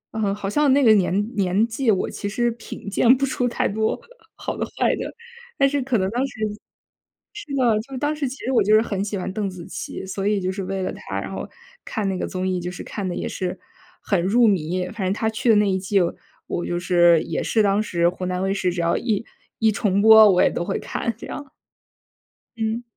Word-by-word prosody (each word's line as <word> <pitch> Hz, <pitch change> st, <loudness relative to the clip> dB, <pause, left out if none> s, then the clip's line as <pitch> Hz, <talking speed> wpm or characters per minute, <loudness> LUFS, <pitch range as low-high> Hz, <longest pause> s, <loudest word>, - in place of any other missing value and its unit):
嗯， 205 Hz, -3 st, 0 dB
好 205 Hz, -1 st, -5 dB
像 290 Hz, +4 st, +3 dB
那 280 Hz, 0 st, +4 dB
个 220 Hz, -, +7 dB
年 205 Hz, +2 st, +1 dB
年 195 Hz, +2 st, +2 dB
纪， 235 Hz, +2 st, -1 dB
我 190 Hz, -, 0 dB
其 205 Hz, -, -5 dB
实 240 Hz, +3 st, +1 dB
品 225 Hz, -2 st, -10 dB
鉴 235 Hz, +5 st, +5 dB
不 275 Hz, -, +1 dB
出 250 Hz, -2 st, -1 dB
太 240 Hz, -, 0 dB
多 220 Hz, +2 st, -1 dB, 0.4 s
好 -, -, -4 dB
的 -, -, -1 dB
坏 -, -, 0 dB
的。 -, -, -5 dB, 0.5 s
但 275 Hz, -, +5 dB
是 285 Hz, -1 st, 0 dB
可 250 Hz, -3 st, 0 dB
能 190 Hz, -1 st, 0 dB
当 250 Hz, +3 st, 0 dB
时 265 Hz, -, -12 dB, 1.0 s
是 415 Hz, -, -8 dB
的， 235 Hz, -5 st, +3 dB
就 265 Hz, +2 st, -8 dB
当 290 Hz, +3 st, -1 dB
时 295 Hz, -2 st, -2 dB
其 270 Hz, -, -8 dB
实 260 Hz, -, 0 dB
我 255 Hz, -, +4 dB
就 215 Hz, +2 st, +4 dB
是 220 Hz, -, +6 dB
很 200 Hz, -4 st, -2 dB
喜 205 Hz, 0 st, -3 dB
欢 185 Hz, 0 st, -4 dB
邓 205 Hz, -2 st, -2 dB
紫 180 Hz, -2 st, -9 dB
琪。 -, -, -6 dB
所 195 Hz, +1 st, -3 dB
以 210 Hz, -1 st, +2 dB
就 185 Hz, 0 st, -1 dB
是 195 Hz, +1 st, -4 dB
为 190 Hz, 0 st, -3 dB
了 -, -, -3 dB
她， 95 Hz, 0 st, -5 dB
然 100 Hz, -, -6 dB
后 -, -, -5 dB, 0.4 s
看 215 Hz, -4 st, -2 dB
那 190 Hz, -, -1 dB
个 -, -, -3 dB
综 185 Hz, 0 st, -3 dB
艺， 185 Hz, -1 st, 0 dB
就 175 Hz, +1 st, -4 dB
是 180 Hz, -, -8 dB
看 200 Hz, -3 st, -5 dB
得 -, -, -3 dB
也 -, -, -3 dB
是 185 Hz, 0 st, -4 dB, 0.4 s
很 195 Hz, -4 st, +1 dB
入 230 Hz, +5 st, +4 dB
迷。 180 Hz, -1 st, 0 dB
反 220 Hz, -1 st, -5 dB
正 185 Hz, -, +1 dB
她 220 Hz, +2 st, -1 dB
去 230 Hz, +3 st, -1 dB
的 220 Hz, -, +7 dB
那 210 Hz, -, +3 dB
一 190 Hz, -, +1 dB
季， 195 Hz, +2 st, -1 dB, 0.5 s
我 175 Hz, -, -2 dB
就 175 Hz, -, -2 dB
是 175 Hz, -2 st, +5 dB
也 165 Hz, -, -3 dB
是 220 Hz, -, +2 dB
当 200 Hz, +1 st, +2 dB
时 170 Hz, -4 st, +1 dB
湖 185 Hz, +1 st, -6 dB
南 180 Hz, 0 st, -2 dB
卫 195 Hz, 0 st, +1 dB
视 185 Hz, -2 st, 0 dB
只 175 Hz, -1 st, -2 dB
要 170 Hz, -, +1 dB
一 225 Hz, -2 st, -1 dB, 0.3 s
一 220 Hz, -1 st, +4 dB
重 200 Hz, -1 st, +1 dB
播， 220 Hz, 0 st, +9 dB
我 180 Hz, -, +4 dB
也 -, -, +4 dB
都 -, -, -2 dB
会 -, -, -1 dB
看 235 Hz, -, -3 dB
这 -, -, -9 dB
样。 290 Hz, -, -6 dB, 1.1 s
嗯。 225 Hz, +2 st, -2 dB
205 Hz, 260 characters per minute, -22 LUFS, 185-230 Hz, 1.1 s, 播